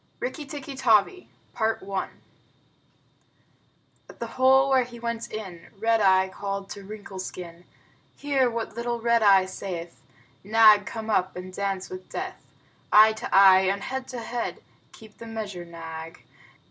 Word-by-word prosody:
"Rikki 335 Hz, -, -5 dB
Tikki 285 Hz, -1 st, -7 dB
Tavi" 250 Hz, -, +2 dB, 0.3 s
At 220 Hz, 0 st, +1 dB, 2.4 s
the 235 Hz, -, -4 dB
hole 265 Hz, +2 st, +4 dB
where 260 Hz, -1 st, +4 dB
he 240 Hz, -1 st, -11 dB
went 235 Hz, 0 st, -4 dB
in 190 Hz, -6 st, -8 dB
Red 225 Hz, +1 st, +2 dB
Eye 190 Hz, -1 st, +4 dB
called 195 Hz, +1 st, -5 dB
to 200 Hz, -, -8 dB
Wrinkle 200 Hz, -1 st, -9 dB
Skin. 175 Hz, -2 st, -8 dB, 0.5 s
Hear 275 Hz, -3 st, +1 dB
what 230 Hz, -1 st, -4 dB
little 235 Hz, 0 st, -3 dB
Red 235 Hz, 0 st, +2 dB
Eye 195 Hz, -3 st, +6 dB
saith: 175 Hz, -4 st, -7 dB, 0.4 s
"Nag, 215 Hz, 0 st, +6 dB
come 220 Hz, -1 st, -5 dB
up 185 Hz, -2 st, +1 dB
and 185 Hz, +1 st, -8 dB
dance 195 Hz, -1 st, -3 dB
with 185 Hz, 0 st, -9 dB
death!" -, -, -6 dB, 0.5 s
Eye 215 Hz, +1 st, +7 dB
to 220 Hz, -, -6 dB
eye 190 Hz, -1 st, +7 dB
and 195 Hz, 0 st, -2 dB
head 265 Hz, 0 st, -4 dB
to 255 Hz, -, -7 dB
head, 235 Hz, +1 st, -4 dB, 0.3 s
(Keep 220 Hz, -1 st, -16 dB
the 230 Hz, -, -9 dB
measure, 205 Hz, -6 st, -6 dB
Nag.) 165 Hz, 0 st, -9 dB
215 Hz, 145 wpm, -25 LUFS, 190-235 Hz, 2.4 s, Eye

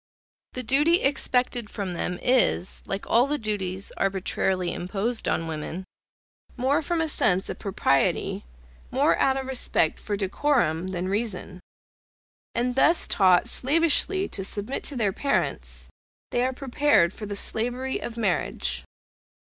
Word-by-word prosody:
The 255 Hz, -, -4 dB
duty 295 Hz, +9 st, +3 dB
expected 250 Hz, -4 st, 0 dB
from 195 Hz, -3 st, -4 dB
them 175 Hz, +1 st, -3 dB
is, 245 Hz, -7 st, +1 dB
like 195 Hz, 0 st, -4 dB
all 240 Hz, +3 st, +3 dB
the 295 Hz, +1 st, 0 dB
duties 200 Hz, -4 st, -4 dB
arbitrarily 190 Hz, -1 st, -1 dB
imposed 210 Hz, +6 st, -3 dB
on 165 Hz, -, 0 dB
women, 160 Hz, +3 st, -5 dB, 0.7 s
more 270 Hz, +5 st, +2 dB
from 330 Hz, +2 st, -1 dB
a 325 Hz, -, 0 dB
sense 190 Hz, -10 st, +1 dB
of -, -, -5 dB
propriety, 185 Hz, -9 st, 0 dB, 0.5 s
more 285 Hz, +4 st, +3 dB
out 270 Hz, 0 st, +3 dB
of 265 Hz, -, -3 dB
respect 255 Hz, -11 st, +1 dB
for 205 Hz, -, -3 dB
decorum, 190 Hz, -, 0 dB
than 185 Hz, -1 st, -3 dB
reason; 200 Hz, -2 st, -3 dB, 1.0 s
and 245 Hz, +1 st, 0 dB
thus 320 Hz, +6 st, +3 dB
taught 185 Hz, +1 st, +4 dB
slavishly 330 Hz, +9 st, +3 dB
to 195 Hz, -, -3 dB
submit 205 Hz, +6 st, -1 dB
to 285 Hz, -, +1 dB
their 210 Hz, -6 st, +1 dB
parents, 280 Hz, +6 st, -1 dB, 0.4 s
they 240 Hz, -, +1 dB
are 260 Hz, -, +1 dB
prepared 265 Hz, -, +2 dB
for 210 Hz, -, -7 dB
the 205 Hz, -, -4 dB
slavery 245 Hz, +6 st, -1 dB
of 235 Hz, -, -6 dB
marriage. 65 Hz, -, -1 dB
220 Hz, 140 wpm, -25 LUFS, 190-265 Hz, 1.0 s, taught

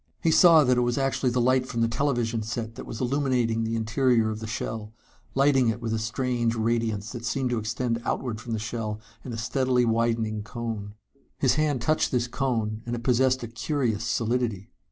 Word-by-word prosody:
He 165 Hz, -, +4 dB
saw 165 Hz, -2 st, +7 dB
that 125 Hz, -2 st, +3 dB
it -, -, +3 dB
was 120 Hz, 0 st, 0 dB
actually 135 Hz, -1 st, +1 dB
the 125 Hz, +1 st, 0 dB
light 130 Hz, +1 st, +3 dB
from 115 Hz, -3 st, -2 dB
the 115 Hz, -, +3 dB
television 120 Hz, -3 st, 0 dB
set 115 Hz, +1 st, -4 dB
that -, -, -9 dB
was 115 Hz, -, -6 dB
illuminating 125 Hz, -4 st, +1 dB
the 115 Hz, 0 st, -1 dB
interior 115 Hz, 0 st, +2 dB
of 110 Hz, -, -5 dB
the 110 Hz, -, -6 dB
shell, 110 Hz, -1 st, -4 dB, 0.4 s
lighting 135 Hz, -2 st, +4 dB
it 115 Hz, +1 st, 0 dB
with 115 Hz, -2 st, -3 dB
a 110 Hz, -, 0 dB
strange 120 Hz, +1 st, -1 dB
radiance 110 Hz, -2 st, -1 dB
that 120 Hz, -2 st, -7 dB
seemed 125 Hz, +2 st, -1 dB
to 120 Hz, -, +1 dB
extend 115 Hz, +2 st, -2 dB
outward 115 Hz, -4 st, -2 dB
from 115 Hz, 0 st, -5 dB
the -, -, 0 dB
shell 110 Hz, -1 st, -4 dB, 0.2 s
in 130 Hz, -, -6 dB
a 115 Hz, -, -4 dB
steadily 125 Hz, +2 st, +1 dB
widening 115 Hz, -2 st, 0 dB
cone. 110 Hz, -2 st, -5 dB, 0.4 s
His 130 Hz, -3 st, +3 dB
hand 145 Hz, -4 st, 0 dB
touched 155 Hz, +5 st, +2 dB
this 125 Hz, -1 st, +1 dB
cone, 115 Hz, -5 st, -1 dB
and 120 Hz, -, -1 dB
it 120 Hz, -, -6 dB
possessed 130 Hz, +1 st, +2 dB
a -, -, -4 dB
curious 115 Hz, -2 st, -1 dB
solidity. 115 Hz, -3 st, -1 dB
120 Hz, 200 wpm, -26 LUFS, 110-130 Hz, 0.4 s, saw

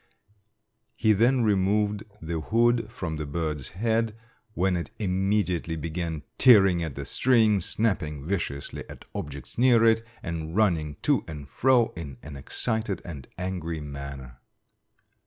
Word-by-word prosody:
He 110 Hz, -2 st, +3 dB
then 120 Hz, +4 st, +3 dB
removed 105 Hz, +1 st, +1 dB, 0.2 s
the 80 Hz, 0 st, -2 dB
hood 115 Hz, +4 st, +2 dB
from 80 Hz, -7 st, -4 dB
the 75 Hz, -, -3 dB
bird's 75 Hz, -2 st, -3 dB
head, 110 Hz, +3 st, 0 dB, 0.4 s
when 95 Hz, +1 st, +2 dB
it 85 Hz, -, -3 dB
immediately 95 Hz, -3 st, 0 dB
began 80 Hz, -1 st, -4 dB, 0.2 s
tearing 95 Hz, -8 st, +7 dB
at 80 Hz, -5 st, -4 dB
the -, -, -5 dB
string, 110 Hz, -5 st, +3 dB
snapping 85 Hz, -9 st, -1 dB
viciously 80 Hz, -6 st, -3 dB
at -, -, -11 dB
objects 70 Hz, -, -7 dB
near 120 Hz, -2 st, +5 dB
it, 115 Hz, 0 st, +4 dB, 0.2 s
and 80 Hz, 0 st, -4 dB
running 85 Hz, -9 st, +2 dB
to -, -, +3 dB
and 75 Hz, -3 st, -7 dB
fro 125 Hz, -, +3 dB
in 75 Hz, -6 st, -7 dB
an 75 Hz, -1 st, -8 dB
excited 110 Hz, -, -2 dB
and 75 Hz, -7 st, -8 dB
angry 90 Hz, -3 st, -3 dB
manner. 70 Hz, -3 st, -8 dB
90 Hz, 135 wpm, -26 LUFS, 80-110 Hz, 0.4 s, tearing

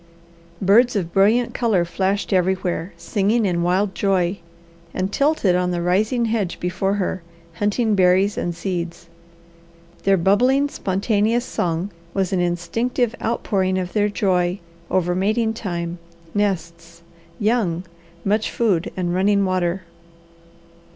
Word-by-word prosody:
Birds 225 Hz, +6 st, +5 dB
of 170 Hz, -4 st, -2 dB
brilliant 220 Hz, +5 st, +3 dB
colour 215 Hz, -8 st, +1 dB
flashed 195 Hz, +4 st, -1 dB
everywhere, 185 Hz, -1 st, 0 dB
singing 205 Hz, +6 st, +1 dB
in 175 Hz, -3 st, 0 dB
wild 185 Hz, +3 st, +1 dB
joy, 190 Hz, -1 st, 0 dB, 0.6 s
and 190 Hz, +2 st, -2 dB
tilted 280 Hz, -, +2 dB
on 180 Hz, 0 st, +1 dB
the 175 Hz, -1 st, -1 dB
rising 210 Hz, +8 st, +1 dB
hedge 220 Hz, -5 st, -1 dB
before 185 Hz, +3 st, -1 dB
her, 185 Hz, -2 st, -2 dB, 0.4 s
hunting 210 Hz, +2 st, +1 dB
berries 190 Hz, +1 st, +3 dB
and 175 Hz, -1 st, -2 dB
seeds. 170 Hz, -1 st, -4 dB, 0.9 s
Their 195 Hz, 0 st, +3 dB
bubbling, 250 Hz, +11 st, +3 dB
spontaneous 215 Hz, +3 st, 0 dB
song 175 Hz, 0 st, -2 dB, 0.2 s
was 195 Hz, -1 st, 0 dB
an 185 Hz, -, +1 dB
instinctive 220 Hz, +8 st, -1 dB
outpouring 190 Hz, -5 st, 0 dB
of 180 Hz, -1 st, -3 dB
their 210 Hz, -1 st, +2 dB
joy 185 Hz, -2 st, 0 dB, 0.3 s
over 180 Hz, -1 st, +1 dB
mating 215 Hz, +5 st, +1 dB
time, 175 Hz, -5 st, -4 dB, 0.3 s
nests, 170 Hz, -4 st, -3 dB, 0.4 s
young, 205 Hz, -6 st, +1 dB, 0.4 s
much 210 Hz, +2 st, +1 dB
food, 205 Hz, -4 st, 0 dB
and 175 Hz, -2 st, -1 dB
running 200 Hz, +2 st, +2 dB
water. 185 Hz, 0 st, 0 dB
190 Hz, 125 wpm, -21 LUFS, 180-210 Hz, 0.9 s, Birds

